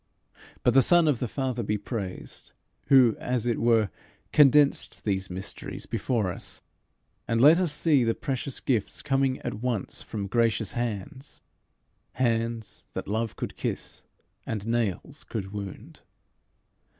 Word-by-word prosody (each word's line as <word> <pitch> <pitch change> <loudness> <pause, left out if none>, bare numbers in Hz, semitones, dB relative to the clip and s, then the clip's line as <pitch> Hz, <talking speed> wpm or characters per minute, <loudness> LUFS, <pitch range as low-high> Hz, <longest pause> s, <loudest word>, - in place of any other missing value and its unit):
But 125 - +4
the 135 - +7
Son 170 +4 +5
of 140 -6 +2
the 125 - -1
Father 130 0 -2
be 105 -1 -1
praised, 100 -3 -6 0.3
who, 130 -5 +6
as 125 -2 -1
it 120 -2 0
were, 115 -4 +3 0.4
condensed 145 -1 +4
these 95 -2 -1
mysteries 95 +2 -5
before 110 -7 -1
us, - - -6 0.6
and 115 - +1
let 150 +7 +7
us 180 -5 +1
see 150 -3 +3
the 115 -1 +1
precious 135 -3 -3
gifts 115 -7 -1
coming 135 -2 +1
at - - -3
once 120 -6 -2
from 105 -3 -5
gracious 115 0 +1
hands 120 +4 -5 0.7
hands 115 -2 -2
that - - -5
love 110 +2 -2
could - - -5
kiss - - -4 0.4
and 110 -2 -3
nails 115 -5 -2
could 100 -3 -5
wound. 100 -2 -8
115 Hz, 140 wpm, -27 LUFS, 105-130 Hz, 0.7 s, the